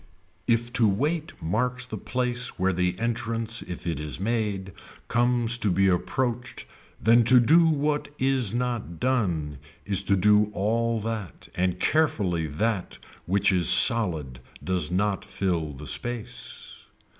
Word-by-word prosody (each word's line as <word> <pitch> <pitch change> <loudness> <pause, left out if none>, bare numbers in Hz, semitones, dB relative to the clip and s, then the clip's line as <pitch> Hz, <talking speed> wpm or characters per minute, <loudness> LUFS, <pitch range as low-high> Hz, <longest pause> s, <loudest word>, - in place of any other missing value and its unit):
If 120 +1 +1
to 120 -3 +3
wait 150 - -1
marks 125 +8 -1
the 125 - -7
place 125 -1 -3
where 95 +1 +1
the 90 0 0
entrance 115 -1 -2
if 90 -2 -8
it 80 -4 -2
is 75 +1 -5
made 100 -3 -2 0.3
comes 120 -1 +2
to 105 - +1
be 95 +2 +3
approached 120 +6 -1 0.3
then 115 +2 +5
to 125 +2 +7
do 165 +8 +5
what 150 -1 0
is 130 -5 +1
not 120 -8 -3
done 85 - -1 0.3
is 100 -2 -1
to 100 - +3
do 105 +2 +4
all 115 +3 0
that 110 -5 -6
and 90 0 -1
carefully 100 - +1
that 95 +6 -2 0.3
which 95 +1 +3
is 90 -4 +2
solid 80 - +4 0.2
does 90 -4 -1
not 100 +2 0
fill 95 -5 -2
the 70 +3 -10
space. 120 +7 -6
110 Hz, 140 wpm, -26 LUFS, 90-120 Hz, 0.3 s, to